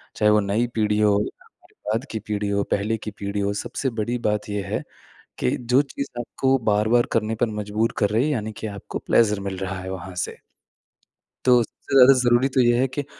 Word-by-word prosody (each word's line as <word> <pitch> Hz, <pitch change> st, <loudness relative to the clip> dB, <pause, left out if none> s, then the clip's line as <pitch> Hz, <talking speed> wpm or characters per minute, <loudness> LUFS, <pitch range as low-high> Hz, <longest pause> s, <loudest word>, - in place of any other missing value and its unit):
चाहे 105 Hz, -, +3 dB
वो 105 Hz, -, +5 dB
नई 105 Hz, +4 st, 0 dB
पीढ़ी 105 Hz, -1 st, +1 dB
हो 105 Hz, -1 st, +4 dB
या -, -, -11 dB, 0.2 s
फिर -, -, -31 dB, 0.2 s
बाद 115 Hz, +5 st, -1 dB
की 110 Hz, -, -3 dB
पीढ़ी 105 Hz, -1 st, -2 dB
हो, 100 Hz, 0 st, +1 dB
पहले 105 Hz, +3 st, -1 dB
की 110 Hz, 0 st, -7 dB
पीढ़ी 100 Hz, +1 st, -3 dB
हो, 100 Hz, 0 st, 0 dB
सबसे 120 Hz, +5 st, -3 dB
बड़ी 120 Hz, +3 st, -1 dB
बात 105 Hz, 0 st, -2 dB
ये 105 Hz, 0 st, -2 dB
है -, -, -2 dB, 0.6 s
कि 65 Hz, -, 0 dB
जो 125 Hz, +3 st, +3 dB
चीज़ 140 Hz, -, -3 dB
आपको 130 Hz, +2 st, +1 dB, 0.2 s
बार-बार 110 Hz, +4 st, +3 dB
करने 110 Hz, 0 st, 0 dB
पर -, -, +5 dB
मजबूर 105 Hz, +2 st, -1 dB
कर 100 Hz, -, +2 dB
रही 115 Hz, +5 st, +2 dB
है 155 Hz, -, 0 dB
यानी 110 Hz, -4 st, -3 dB
कि 110 Hz, -, -6 dB
आपको 100 Hz, -2 st, -6 dB
प्लेज़र 105 Hz, -3 st, +2 dB
मिल 100 Hz, -1 st, -4 dB
रहा 95 Hz, 0 st, -4 dB
है 95 Hz, 0 st, -6 dB
वहाँ 95 Hz, 0 st, -7 dB
से। -, -, -3 dB, 1.1 s
तो 125 Hz, -2 st, +5 dB
सबसे 135 Hz, -, -7 dB
ज़्यादा 135 Hz, 0 st, +9 dB
ज़रूरी 120 Hz, +2 st, +3 dB
तो -, -, +6 dB
ये 120 Hz, 0 st, +4 dB
है 130 Hz, -, +3 dB
कि 145 Hz, +3 st, -4 dB
110 Hz, 220 wpm, -23 LUFS, 100-120 Hz, 1.1 s, ज़्यादा